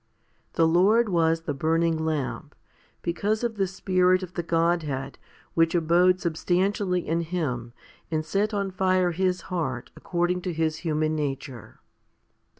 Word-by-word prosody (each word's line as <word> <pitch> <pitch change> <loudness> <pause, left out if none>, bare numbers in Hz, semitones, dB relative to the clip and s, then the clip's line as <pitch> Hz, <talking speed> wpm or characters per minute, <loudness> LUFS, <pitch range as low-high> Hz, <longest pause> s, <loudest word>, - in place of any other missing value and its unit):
The 165 - +3
Lord 205 +7 +4
was 165 -2 +2
the 155 -3 -3
burning 165 +3 +1
lamp? 155 -4 -3 0.5
because 205 +6 -1
of 230 -2 -2
the 195 -1 +1
Spirit 185 0 +2
of 180 -1 -8
the 175 - -2
Godhead 165 -5 -1 0.3
which 165 +1 +2
abode 175 +2 +4
substantially 180 +2 0
in 165 +2 +1
Him 150 -9 -3 0.4
and 155 -1 -1
set 200 +6 0
on 200 -2 -2
fire 185 -1 +2
His 185 +1 0
heart 130 -8 -3
according 175 +1 -1
to 180 -1 -3
His 160 -1 0
human 155 -1 -1
nature. 135 -4 -5
170 Hz, 140 wpm, -26 LUFS, 160-185 Hz, 0.5 s, Lord